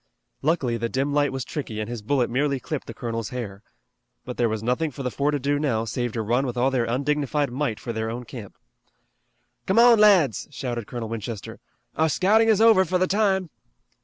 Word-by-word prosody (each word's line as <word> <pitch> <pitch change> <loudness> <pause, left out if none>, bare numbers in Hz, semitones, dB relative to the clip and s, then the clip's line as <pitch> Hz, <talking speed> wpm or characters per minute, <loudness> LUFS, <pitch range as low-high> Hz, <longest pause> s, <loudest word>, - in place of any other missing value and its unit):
Luckily 135 -6 +1
the 115 0 -2
dim 135 +3 -1
light 145 -1 +2
was 135 -2 -4
tricky 115 -8 -5
and 105 - -3
his 120 -2 -5
bullet 125 +3 +1
merely 140 +2 0
clipped 150 +2 -5
the 115 - -7
colonel's 115 -2 -4
hair. 105 -6 -6 0.6
But 125 - -6
there 120 -1 +2
was 110 0 -3
nothing 125 +7 0
for 135 0 -8
the 125 - -2
four 140 +4 0
to 150 - +1
do 145 +1 0
now 115 -7 0
save 120 +2 -2
to 115 - -2
run 120 +5 +1
with 125 - -4
all 130 +2 +2
their 125 -3 +1
undignified 140 +2 0
might 125 -4 -2
for 115 0 -5
their 110 0 -2
own 120 +2 -5
camp. 115 -4 -10 1.1
"Come 190 - +1
on, 235 -1 +7
lads!" 190 - +4
shouted 120 -5 -5
Colonel 120 -2 -5
Winchester. 110 -1 -6 0.4
"Our 160 0 +2
scouting 215 +8 +3
is 220 -1 +4
over 225 -4 +6
for 185 +1 0
the 185 - +2
time!" 190 -3 +1
130 Hz, 210 wpm, -24 LUFS, 115-150 Hz, 1.1 s, on